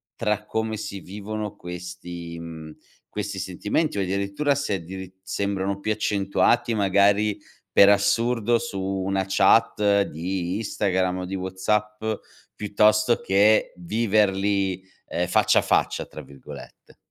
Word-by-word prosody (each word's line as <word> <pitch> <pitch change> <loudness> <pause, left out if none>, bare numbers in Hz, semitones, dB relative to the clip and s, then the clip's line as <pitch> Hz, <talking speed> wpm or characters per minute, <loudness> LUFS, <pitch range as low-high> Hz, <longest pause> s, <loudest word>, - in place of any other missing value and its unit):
tra 105 -2 -1
come 110 0 -2
si 100 -1 -6
vivono 105 +2 -6
questi 90 -1 -8
mhmm, 80 -2 -9 0.3
questi 100 -1 -4
sentimenti? 105 - -1
O - - +1
addirittura 100 +9 0
se 140 -7 -1
addiritt 95 +1 -8
sembrano 100 0 -2
più 110 +2 -2
accentuati 105 +3 +1
magari, 100 +1 +3 0.3
per 100 - +7
assurdo, 115 +3 +2
su 115 -5 -5
una 95 0 -1
chat 100 +1 +4
di 90 +1 -3
Instagram 95 -4 0
o 90 - -4
di 95 +2 -4
WhatsApp, 105 +3 -2 0.5
piuttosto 105 +2 +3
che 105 +3 +3
viverli, 100 -1 +1 0.3
ehm, 90 +1 -1
"faccia 90 - +4
a - - +1
faccia" - - +1
tra - - -10
virgolette? 70 -2 -13
100 Hz, 125 wpm, -24 LUFS, 95-105 Hz, 0.5 s, per